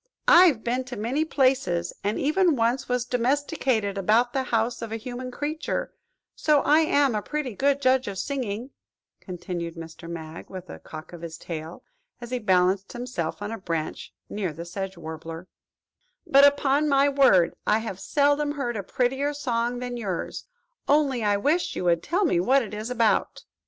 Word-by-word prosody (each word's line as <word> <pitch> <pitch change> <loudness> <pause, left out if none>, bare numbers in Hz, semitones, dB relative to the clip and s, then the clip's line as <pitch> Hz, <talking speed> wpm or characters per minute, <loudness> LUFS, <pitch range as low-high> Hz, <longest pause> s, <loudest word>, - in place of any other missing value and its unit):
"I 355 +2 +9
have 270 -11 +2
been 250 +2 -1
in 245 - -5
many 255 +8 0
places, 255 - +1
and 205 +2 0
even 325 +3 +2
once 240 +2 0
was 250 -1 0
domesticated 250 - 0
about 225 +5 +2
the 270 - +1
house 230 0 0
of 230 -1 -5
a 225 - -2
human 250 +2 -6
creature, 295 +5 -3 0.4
so 305 - +2
that - - -5
I 300 +2 +6
am 285 -5 +3
a 210 - -1
pretty 295 -1 -3
good 280 +6 +1
judge 260 0 +3
of 200 -1 -4
singing," 245 0 -3 0.5
continued 175 -2 -6
Mr. 165 0 -9
Mag, 160 -1 -8
with 185 -1 -8
a - - -9
cock 155 +2 -10
of 170 - -9
his 165 -1 -7
tail, 160 0 -7 0.4
as 240 0 -9
he 250 - -1
balanced 190 -2 +2
himself 240 -8 -4
on 205 - -4
a 225 - -5
branch 165 -4 -4 0.2
near 200 -5 -3
the 165 +3 -7
Sedge 190 +1 -5
Warbler; 165 +1 -8 0.8
"but, 275 +1 +6
upon 285 +1 +2
my 275 0 +4
word, 270 -12 +4
I 210 - +4
have 220 -4 -5
seldom 290 +3 +1
heard 245 -5 -3
a 205 - -2
prettier 265 +8 -1
song 240 -3 -1
than 245 0 -4
yours–only 285 - -2
I 205 -1 +2
wish 300 - 0
you - - -3
would 170 -2 +2
tell 360 - 0
me 235 - +2
what 260 +9 +3
it 215 - -8
is 215 +3 -4
all 250 - -3
about." 225 -2 +1
240 Hz, 180 wpm, -25 LUFS, 190-275 Hz, 0.8 s, I